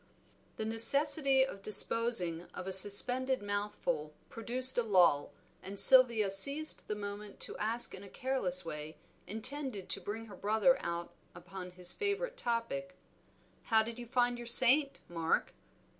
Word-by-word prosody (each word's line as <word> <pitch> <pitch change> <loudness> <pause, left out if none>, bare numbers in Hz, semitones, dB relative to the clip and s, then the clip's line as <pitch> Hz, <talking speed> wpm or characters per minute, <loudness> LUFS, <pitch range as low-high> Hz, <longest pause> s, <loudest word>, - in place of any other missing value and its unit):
The 220 - -6
necessity 275 +4 +2
of 200 -7 -11
disposing 200 -5 +2
of 180 - -9
a 190 - -5
suspended 250 +6 +1
mouthful 205 - -6
produced 250 +3 -1
a - - +1
lull, 180 -10 0 0.3
and 195 +1 -9
Sylvia 235 -5 +6
seized 280 +10 +5
the 210 - -5
moment 205 0 -10
to - - -9
ask 225 +3 +3
in 190 - -11
a 200 - -14
careless 190 -10 -4
way, 150 -1 -10 0.3
intended 225 -2 -4
to 195 - -6
bring 220 +4 -8
her 205 -3 -14
brother 220 +6 0
out 170 0 -7 0.2
upon 180 +1 -11
his 180 0 0
favorite 425 +5 -5
topic, 275 - -6 0.7
"How 220 -1 +1
did 230 +2 -10
you 240 - -11
find 245 0 -2
your 240 - -10
saint, 260 +4 +3
Mark?" 165 -1 -4
220 Hz, 145 wpm, -30 LUFS, 190-255 Hz, 0.7 s, Sylvia